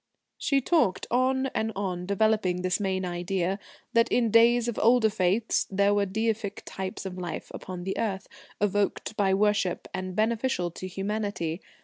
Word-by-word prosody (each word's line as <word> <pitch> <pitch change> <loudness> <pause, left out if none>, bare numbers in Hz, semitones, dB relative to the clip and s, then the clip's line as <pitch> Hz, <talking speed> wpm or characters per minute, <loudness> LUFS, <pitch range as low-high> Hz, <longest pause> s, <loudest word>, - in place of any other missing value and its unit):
She 275 -2 +2
talked 280 - +2
on 260 +2 +2
and 220 0 -1
on, 180 -3 -3
developing 200 -3 +1
this 185 +2 +1
main 190 -2 -1
idea 180 +2 -1 0.3
that 230 0 +3
in 235 -3 +2
days 235 +1 +5
of 235 - -2
older 230 -1 +5
faiths 200 +3 +1
there 200 +1 +3
were 205 -1 +2
deific 220 0 -2
types 190 0 -5
of 185 -1 -5
life 175 -2 -5
upon 180 -1 -7
the 190 +1 -2
earth, 195 -4 -2 0.3
evoked 205 +1 0
by 195 -2 +2
worship 205 -3 +1
and 185 -1 -4
beneficial 220 -4 0
to 185 +3 -7
humanity. 195 -3 -3
200 Hz, 155 wpm, -27 LUFS, 185-225 Hz, 0.3 s, days